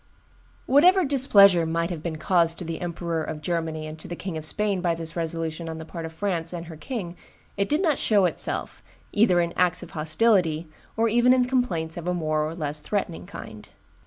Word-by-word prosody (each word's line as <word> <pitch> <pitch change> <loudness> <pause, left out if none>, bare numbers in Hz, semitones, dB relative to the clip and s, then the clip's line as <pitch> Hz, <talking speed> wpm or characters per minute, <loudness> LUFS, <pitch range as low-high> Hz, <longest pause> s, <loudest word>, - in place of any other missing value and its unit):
Whatever 355 +7 +5
displeasure 200 -10 +5
must 165 +2 -1
have 165 -3 -5
been 160 -1 -4
caused 165 0 +2
to 180 - -6
the 165 0 -5
Emperor 170 -2 -3
of 155 -1 -5
Germany 160 -1 -3
and 155 +1 -8
to - - -10
the 175 - -5
King 185 -1 -6
of 155 - -5
Spain 200 +3 +2
by 170 -2 +1
this 165 0 -7
resolution 165 0 -3
on 160 - -5
the 160 - -8
part 165 0 -7
of - - -10
France 170 -1 -2
and 170 -1 -5
her 165 -1 -9
king, 180 - -5 0.4
it 200 0 -1
did 305 +6 +1
not 310 -6 +2
show 205 -4 +3
itself, 175 - -3 0.3
either 205 -4 +4
in 170 -1 0
acts 180 -1 +1
of - - -11
hostility 165 -1 +1 0.3
or 230 +1 +3
even 240 +3 +4
in 255 -1 +3
complaints 190 -12 -1
of 170 0 -6
a 180 - 0
more 155 -2 0
or 155 +2 -4
less 150 -2 -2
threatening 180 0 -3
kind. 110 - -10
170 Hz, 210 wpm, -25 LUFS, 160-200 Hz, 0.4 s, Whatever